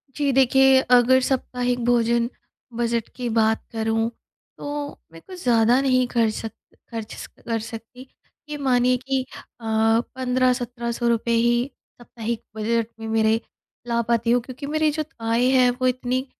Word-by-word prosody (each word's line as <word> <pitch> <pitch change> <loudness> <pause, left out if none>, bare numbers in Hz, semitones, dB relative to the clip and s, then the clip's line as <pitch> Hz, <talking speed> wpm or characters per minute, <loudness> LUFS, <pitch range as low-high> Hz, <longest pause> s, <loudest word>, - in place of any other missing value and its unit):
जी। 285 -2 +1
देखिए, 265 0 +5
अगर 250 +1 +5
साप्ताहिक 250 -2 -1
भोजन 235 0 +2 0.5
बजट 235 -1 0
की 250 -1 -4
बात 220 0 +2
करूँ 225 0 0 0.5
तो 290 0 -5
मैं 165 0 -13
कुछ 365 -2 -11
ज़्यादा 235 +1 +4
नहीं 255 -2 +3
खर 230 -2 +1
सक 225 0 -5 0.4
ख़र्च 225 -2 -6 0.2
कर 230 -1 -1
सकती। 230 +4 -9 0.4
ये 295 - -4
मानिए 250 -2 +2
कि 265 +1 -1 0.4
अ, - - -16 0.5
15-17 245 -2 0
ही 240 +3 +2 0.3
साप्ताहिक 235 -1 -5
बजट 225 +1 0
में 225 - -6
मेरे 220 0 +2 0.5
ला 235 0 +1
पाती 235 0 +1
हूँ 245 - +3
क्योंकि 260 +4 -8
मेरी 310 0 +1
जो 310 +1 -2 0.2
आय 230 +2 +1
है 255 -1 +5
वो 255 - +3
इतनी 255 +1 -1
240 Hz, 145 wpm, -23 LUFS, 230-255 Hz, 0.5 s, देखिए